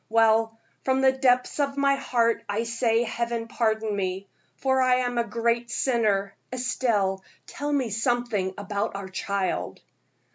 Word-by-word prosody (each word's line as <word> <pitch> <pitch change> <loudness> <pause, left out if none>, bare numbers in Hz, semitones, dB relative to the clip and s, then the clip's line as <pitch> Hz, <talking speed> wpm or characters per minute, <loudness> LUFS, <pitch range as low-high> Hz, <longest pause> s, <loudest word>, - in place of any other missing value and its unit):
Well, 225 0 +3 0.3
from 265 0 +1
the 265 0 +6
depths 255 0 +1
of 280 -1 0
my 280 0 +3
heart 230 -4 +1
I 210 +3 0
say 230 0 +1
Heaven 235 0 -3
pardon 220 -2 0
me, 190 0 -2 0.3
for 265 -1 +2
I 255 -1 +4
am 245 -1 -1
a - - +3
great 235 +1 -1
sinner. 210 -6 +1 0.2
Estelle, 230 -7 0 0.2
tell 290 +1 -4
me 265 -6 0
something 225 -4 0
about 205 0 -3
our 195 -1 -6
child." 195 0 -2
230 Hz, 145 wpm, -26 LUFS, 205-250 Hz, 0.3 s, the